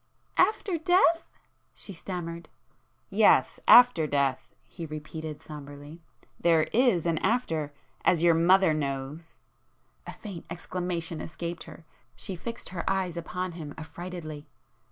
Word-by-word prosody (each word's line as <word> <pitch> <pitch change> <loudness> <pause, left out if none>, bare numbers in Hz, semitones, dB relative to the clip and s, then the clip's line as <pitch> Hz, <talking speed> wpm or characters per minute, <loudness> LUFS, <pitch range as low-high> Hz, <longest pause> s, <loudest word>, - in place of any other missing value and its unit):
"After 390 -5 +2
death! 335 0 +3 0.2
..." - - -44
she 200 - -7
stammered. 170 -1 -6 0.6
"Yes,—after 245 -11 +6
death!" 140 -3 0
he 170 -3 -8
repeated 155 0 -7
sombrely—"There 150 +2 -3
is 230 -9 +3
an 165 -2 +1
after;—as 160 - -1
your 170 -1 +6
mother 175 +1 +5
knows!" 145 +2 -4 0.7
A - - -4
faint 195 -6 -9
exclamation 175 -2 -4
escaped 170 +2 -6
her,—she 165 +3 -9
fixed 230 +7 -6
her 175 -2 -4
eyes 190 -3 0
upon 180 +2 -4
him 155 -4 -8
affrightedly. 160 -2 -7
170 Hz, 110 wpm, -28 LUFS, 155-185 Hz, 0.7 s, Yes,—after